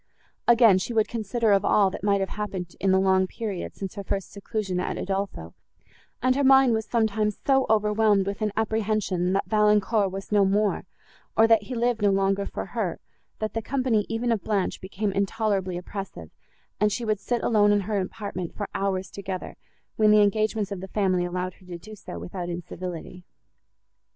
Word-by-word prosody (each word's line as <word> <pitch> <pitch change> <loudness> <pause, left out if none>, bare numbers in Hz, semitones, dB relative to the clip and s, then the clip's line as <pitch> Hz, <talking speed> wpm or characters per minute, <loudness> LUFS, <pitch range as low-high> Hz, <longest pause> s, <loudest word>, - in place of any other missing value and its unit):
Again 230 -5 +6
she 235 - -4
would 220 -2 +2
consider 230 0 0
of 200 -1 +4
all, 200 -2 +3
that - - -7
might 200 -1 +2
have 195 - -1
happened 190 -4 -5
in 195 - +2
the 190 - +5
long 190 0 +3
period, 205 -3 -5
since 195 -2 -6
her 200 - -6
first 195 -1 -3
seclusion 200 -2 -3
at - - -2
Udolpho, 190 - -3 0.7
and 255 0 +3
her 280 - +1
mind 265 -2 +6
was 220 -1 -1
sometimes 215 -2 0
so 270 -1 +3
overwhelmed 210 -2 +3
with 200 +2 -4
an 215 -1 0
apprehension, 215 -4 0
that 195 - +1
Valancourt 210 -1 +2
was 195 +2 -7
no 205 -1 +4
more, 200 +1 +1 0.5
or 225 - +7
that 225 -1 +5
he 255 - -5
lived 235 -1 0
no 205 - +4
longer 195 0 +1
for - - -5
her, - - -3 0.4
that 215 0 -3
the 225 - -2
company 250 -4 0
even 235 +1 -1
of 225 -4 0
Blanche 205 -3 -1
became 200 +2 -2
intolerably 195 -2 -1
oppressive, 180 - -7 0.5
and 210 0 +3
she 235 +3 -3
would 215 -2 0
sit 240 +4 -2
alone 205 -2 +4
in 205 0 +3
her 205 +1 -1
apartment 185 -3 -5
for 205 - -4
hours 190 -1 -2
together, 190 -2 -6 0.4
when 215 -1 +5
the 210 0 +6
engagements 215 0 0
of 195 -2 -4
the 190 - -6
family 185 -3 +1
allowed 180 +1 -3
her 185 - -21
to 175 -1 -6
do 215 +5 -11
so, 195 - -9
without 130 - -6
incivility. 175 +1 -6
205 Hz, 190 wpm, -25 LUFS, 190-220 Hz, 0.7 s, or